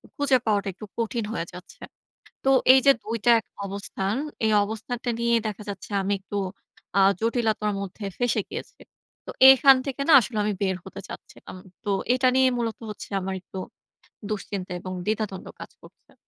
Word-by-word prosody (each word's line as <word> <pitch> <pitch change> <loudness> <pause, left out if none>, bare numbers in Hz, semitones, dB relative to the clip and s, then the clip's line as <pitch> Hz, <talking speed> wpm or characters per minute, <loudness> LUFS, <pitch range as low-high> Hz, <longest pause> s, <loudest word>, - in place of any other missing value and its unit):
খুঁজে 280 -2 +3
পাওয়াটা 205 -2 +1
একটু 215 - -10
কঠিন 230 0 -1
হয়ে 170 -6 -2
যাচ্ছে। 180 0 -13 0.6
তো 270 - +4 0.2
এই 265 - +6
যে 275 - +9
২ 225 +2 -3
টা 240 - +5
এক - - -27 0.2
অবস্থান, 195 0 -3 0.3
এই 220 - +3
অবস্থানটা 225 +3 -4
নিয়ে 235 0 +3
দেখা 210 0 -5
যাচ্ছে 200 +1 -7
আমি 195 +1 -1
একটু 200 +1 -7 0.6
আ - - +6 0.2
জটিলতার 220 -2 0
মধ্যে 200 +2 -7
ফেঁসে 245 -3 +1
গিয়েছি। - - -8 0.5
তো - - -5 0.2
এখান 270 +1 +6
থেকে 275 0 -4
না 320 - +6
আসলে 230 0 -5
আমি 210 - 0
বের 190 -2 +1
হতে - - -9
চাচ্ছিলাম। - - -11 0.3
তো 205 - -2 0.2
এটা 255 0 +3
নিয়ে 260 0 +5
মূলত 230 -2 -2
হচ্ছে - - -8
আমার 190 +1 -3
একটু 190 - -10 0.7
দুশ্চিন্তা 195 -2 -4
এবং 185 - -7
দ্বিধাদ্বন্দ্ব 210 -3 -3
কাজ - - -9
করছে। - - -19
215 Hz, 170 wpm, -25 LUFS, 200-240 Hz, 0.7 s, যে